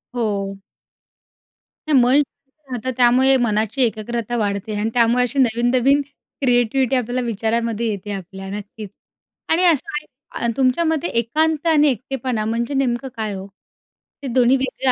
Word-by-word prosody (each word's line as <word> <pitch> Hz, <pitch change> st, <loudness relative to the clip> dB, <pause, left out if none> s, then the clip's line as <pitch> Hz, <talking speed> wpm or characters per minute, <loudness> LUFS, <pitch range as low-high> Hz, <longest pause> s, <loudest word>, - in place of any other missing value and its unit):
हो. 200 Hz, -4 st, -2 dB, 1.3 s
मन 265 Hz, 0 st, +5 dB
शांत 275 Hz, +1 st, -11 dB, 0.2 s
राहतं 260 Hz, -, -1 dB
त्यामुळे 255 Hz, +2 st, +5 dB
मनाची 220 Hz, +1 st, 0 dB
एकाग्रता 235 Hz, +1 st, -2 dB
वाढते 205 Hz, -1 st, -2 dB
आणि 215 Hz, +2 st, 0 dB
त्यामुळे 240 Hz, +1 st, +3 dB
अशी 250 Hz, +3 st, -1 dB
नवीन-नवीन 250 Hz, +3 st, +3 dB, 0.4 s
क्रिएटिव्हिटी 250 Hz, 0 st, +2 dB
आपल्याला 250 Hz, 0 st, -1 dB
विचारामध्ये 230 Hz, +1 st, -1 dB
येते 205 Hz, 0 st, -6 dB
आपल्या 195 Hz, 0 st, -7 dB
नक्कीच. 205 Hz, +1 st, -7 dB, 0.6 s
आणि 335 Hz, +3 st, +3 dB
असं 290 Hz, -6 st, -1 dB
तुमच्या 260 Hz, +4 st, +2 dB
मते 320 Hz, 0 st, 0 dB
एकांत 310 Hz, +7 st, 0 dB
आणि 300 Hz, -2 st, +4 dB
एकटेपणा 250 Hz, -2 st, -3 dB
म्हणजे 235 Hz, +4 st, -2 dB
नेमकं 265 Hz, -1 st, 0 dB
काय 215 Hz, -2 st, -3 dB
हो? 190 Hz, 0 st, -6 dB, 0.8 s
हे -, -, -3 dB
दोन्ही 255 Hz, +1 st, +4 dB
वेगळं 265 Hz, 0 st, 0 dB
240 Hz, 130 wpm, -20 LUFS, 220-270 Hz, 1.3 s, मन